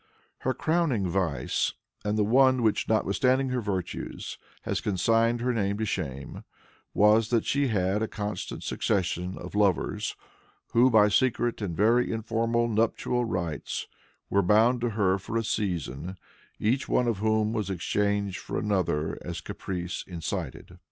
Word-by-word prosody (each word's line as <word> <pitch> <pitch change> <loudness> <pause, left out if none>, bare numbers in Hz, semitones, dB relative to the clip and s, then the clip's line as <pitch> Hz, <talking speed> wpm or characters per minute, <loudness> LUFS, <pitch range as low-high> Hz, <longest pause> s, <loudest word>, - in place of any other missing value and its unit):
Her 130 - -1
crowning 155 - +1
vice, 85 -5 0 0.3
and 105 +1 0
the 105 - +3
one 130 +3 +4
which, 110 -2 +1
notwithstanding 125 +5 +2
her 125 -1 -1
virtues, 95 -5 -4 0.2
has - - -2
consigned 115 +4 +2
her 125 +1 +1
name 100 -3 0
to 110 - -1
shame, 70 -8 -4 0.5
was 105 +2 +5
that 115 -2 +2
she 140 0 +1
had 100 -2 +1
a 110 - 0
constant 105 -4 -5
succession 90 -3 -1
of - - -8
lovers 100 -4 +1 0.6
who 120 +2 +5
by 110 -3 +6
secret 120 +1 +1
and 90 -6 -3
very 115 +5 +3
informal 115 +1 0
nuptial 115 +2 0
rites 85 -8 -3 0.4
were 100 - +2
bound 110 +6 +4
to 120 - +1
her 100 -3 +1
for 110 +4 -3
a 115 - 0
season, 90 -5 -3 0.4
each 125 +6 0
one 125 - +2
of 115 -5 0
whom 110 0 +1
was 105 -4 -2
exchanged 100 +1 0
for - - -5
another 90 -7 0
as - - -5
caprice 90 -2 -5
incited. 85 -5 -5
105 Hz, 145 wpm, -27 LUFS, 95-115 Hz, 0.6 s, by